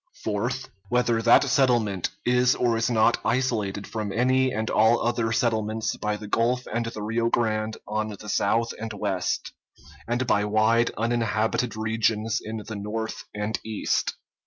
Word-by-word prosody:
Fourth. 120 +5 -2 0.2
Whether 120 -2 +2
that 115 +1 +6
settlement 120 - +2 0.2
is 125 +1 +3
or 120 -2 +1
is 115 +1 +1
not 115 0 +3
isolated 110 -6 0
from 105 -2 -4
any 130 +3 +2
and 110 -1 -2
all 110 +2 +4
other 115 -1 0
settlements 110 -2 0
by 105 0 -2
the 105 - -9
Gulf 120 +4 +1
and 115 0 -1
the 110 -2 -5
Rio 115 +2 0
Grande 110 -2 0
on 110 0 -1
the 105 0 -9
south 115 +2 +1
and 110 0 -5
west, 95 -3 -2 0.5
and 120 +2 0
by 105 -3 +2
wide 110 +3 +3
uninhabited 115 0 0
regions 110 0 0
in 110 0 -5
the 110 - -6
north 110 +2 -4
and 105 +1 -2
east. 110 -1 -1
110 Hz, 155 wpm, -25 LUFS, 110-120 Hz, 0.5 s, that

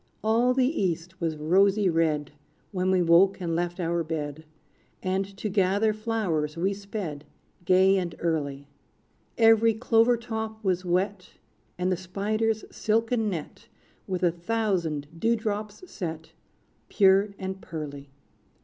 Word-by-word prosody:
All 235 +3 +3
the 260 -1 +3 0.2
East 180 0 -2
was 160 -2 -1
rosy 195 +6 +3
red, 160 -4 +1 0.4
When 185 -2 0
we 185 -1 +3
woke 175 +4 +5
and 170 -3 -2
left 175 +1 -2
our 170 -1 0
bed; 155 -1 -5 0.6
And 190 +1 0
to 215 - -3
gather 200 +2 +2
flowers 200 -9 -2
we 190 +4 +1
sped, 195 -7 -6 0.4
Gay 190 +2 +5
and 170 -3 -4
early. 145 -4 -2 0.7
Every 225 0 +5
clover 230 +1 +3
top 220 -2 -5
was 185 -2 0
wet, 185 +2 -1 0.4
And 180 +1 0
the 185 - +1
spider's 215 +4 -1
silken 225 0 0
net 165 -6 -6 0.4
With 185 -2 -3
a 175 - +4
thousand 175 -5 -1
dew 230 +4 +2
drops 210 - -4
set, 160 -4 -6 0.6
Pure 200 0 +4
and 190 0 -5
pearly. 145 -3 -7
190 Hz, 130 wpm, -26 LUFS, 170-215 Hz, 0.7 s, woke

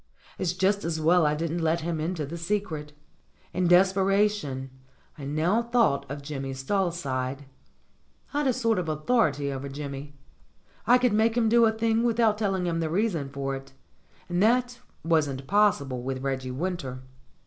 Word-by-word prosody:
It's 175 -1 0
just 195 +2 +1
as 160 -1 -2
well 165 +1 +4
I 150 - +1
didn't 165 +2 -2
let 165 +1 +1
him 165 0 -2
into 160 -1 -2
the 155 +5 -7
secret. 170 -4 -3 0.6
In 180 0 +1
des 180 +2 +7
peration 195 -9 +1 0.5
I 140 - -8
now 160 +10 +1
thought 235 - +1
of 140 +1 -6
Jimmy 135 -2 -5
Stalside. 140 -4 -2 0.9
I'd 290 -1 +1
a - - +4
sort 230 -4 +1
of 170 -3 -3
authority 150 - +1
over 135 +1 -5
Jimmy. 140 0 -7 0.7
I 245 +1 +7
could 250 -3 +2
make 225 +2 +2
him 225 -2 +3
do 235 +1 +5
a 220 - +4
thing 225 0 +1
without 230 -2 +2
telling 195 -4 0
him 165 -1 -1
the 160 -1 -1
reason 170 -6 0
for 135 0 -3
it, 135 0 -10 0.5
and 175 +1 -1
that 245 +2 +2 0.3
wasn't 145 -5 +1
possible 145 -10 +2
with 130 +1 -4
Reggie 130 -1 -2
\Vinter. 135 -2 -4
170 Hz, 165 wpm, -27 LUFS, 140-210 Hz, 0.9 s, des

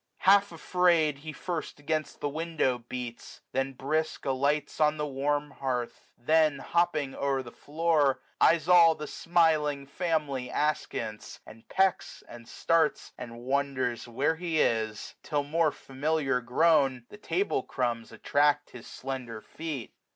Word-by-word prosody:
Half 200 +1 +5
afraid, 165 -3 +2
he 155 +2 -7
first 165 0 -5
130 145 - -20
Against 155 -1 -3
the 145 - -1
window 155 -5 -1
beats; 125 -2 -7
then, 135 +1 -1
brisk, 155 +4 -2
alights 140 +4 0
On 150 0 +3
the 150 - -1
warm 145 +1 -1
hearth; 125 -3 -4
then, 155 +3 +3
hopping 155 -2 0
o'er 135 -1 -1
the 120 - -10
floor, 150 -3 +1 0.2
£yes 165 -2 +4
all 170 -2 +7
the 150 - -6
smiling 155 -4 +1
family 145 -5 -2
askance, 115 -8 -3
And 110 +1 -15
pecks, 190 -1 0
and 120 -1 -12
starts, 165 +2 0
and 120 -1 -9
wonders 130 -2 -1
where 135 +7 0
he 165 -2 -1
is: 110 -4 0
Till 145 -2 -1
more 155 +2 +1
familiar 140 -1 -1
grown, 135 0 +2
the - - -11
table 185 -5 -1
crumbs 120 -3 -2
255 115 - -12
Attract 145 0 +2
his 120 - -11
slender 125 -4 -6
feet. 150 0 -6
145 Hz, 145 wpm, -28 LUFS, 130-160 Hz, 0.2 s, all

